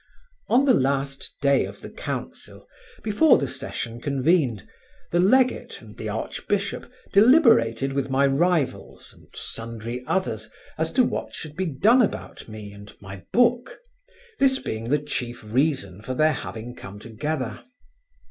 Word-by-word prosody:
On 255 +3 +4
the 265 - +5
last 135 - 0
day 140 -1 +4
of - - -8
the - - -8
council, - - -7 0.4
before 225 +8 +5
the 140 - -1
session 120 -3 -5
convened, 140 - +1 0.4
the 175 - +2
legate 255 +8 +3
and - - -14
the - - -5
archbishop 200 +3 -3 0.2
deliberated 200 - +5
with 135 -1 -1
my 135 +1 +3
rivals 155 +1 0
and - - -20
sundry 115 +2 -5
others 110 - -1 0.3
as 160 +1 -1
to 255 - +5
what - - -3
should 155 -2 -8
be 190 +1 -1
done 210 - +4
about 225 - -3
me 110 -2 -9
and 100 0 -12
my 95 -1 -10
book, 245 - +2 0.6
this 265 -1 +4
being 110 - -5
the 145 - +4
chief 125 -5 -5
reason 110 - 0
for 130 +3 -4
their 155 +3 +3
having 120 -2 -6
come 100 +1 -10
together. 115 +2 -4
140 Hz, 145 wpm, -24 LUFS, 115-190 Hz, 0.6 s, the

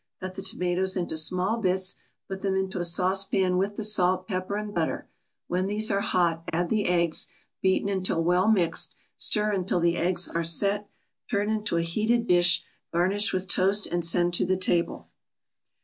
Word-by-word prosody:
Cut 185 0 -6
the 195 - -7
tomatoes 185 0 -1
into 175 -3 -3
small 185 +7 +1
bits, 185 -2 0 0.3
put 190 0 -6
them 195 -1 -1
into 190 -1 -2
a - - -1
saucepan 185 +1 +1
with 200 +2 -2
the 220 - -4
salt, 185 -3 +3
pepper 185 -1 -3
and 210 0 -5
butter; 165 -4 -2 0.4
when 185 +2 -1
these 215 +2 +1
are 200 - +1
hot 170 -4 0
add 175 +1 -1
the 215 -2 0
eggs, 170 -2 +1 0.3
beaten 190 +1 +1
until 185 -4 0
well 180 +3 +2
mixed, 190 -7 +2 0.2
stir 210 0 +1
until 185 -2 -1
the 170 0 +1
eggs 175 +1 +2
are 170 - 0
"set," 200 +5 +2 0.4
turn 205 -1 0
into 210 -5 -1
a 170 - +1
heated 220 +7 0
dish, 175 -3 +3 0.3
garnish 190 +5 +1
with 185 0 -2
toast 195 +2 +3
and 175 0 -2
send 175 +1 +2
to - - +2
the 185 +1 0
table. 175 -2 -1
185 Hz, 180 wpm, -26 LUFS, 175-200 Hz, 0.4 s, salt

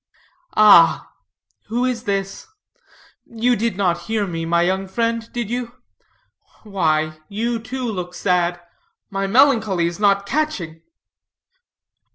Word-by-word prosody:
"Ah, 185 -6 +6 0.6
who 240 +3 -1
is 250 -2 -3
this? 195 - -3 0.8
You 240 +2 0
did 225 -2 -2
not 175 -3 0
hear 220 -2 0
me, 165 -3 -4
my 170 +1 +2
young 190 +2 -1
friend, 230 +3 -2
did 240 -3 -3
you? 240 -1 -4 0.9
Why, 155 -6 -1
you, 230 +3 -2
too, 250 +3 -5
look 180 -6 -4
sad. 175 -2 0 0.5
My 195 0 -2
melancholy 220 -6 +3
is 170 +2 -3
not 200 -1 +2
catching!" 200 - -3
200 Hz, 120 wpm, -20 LUFS, 175-230 Hz, 0.9 s, Ah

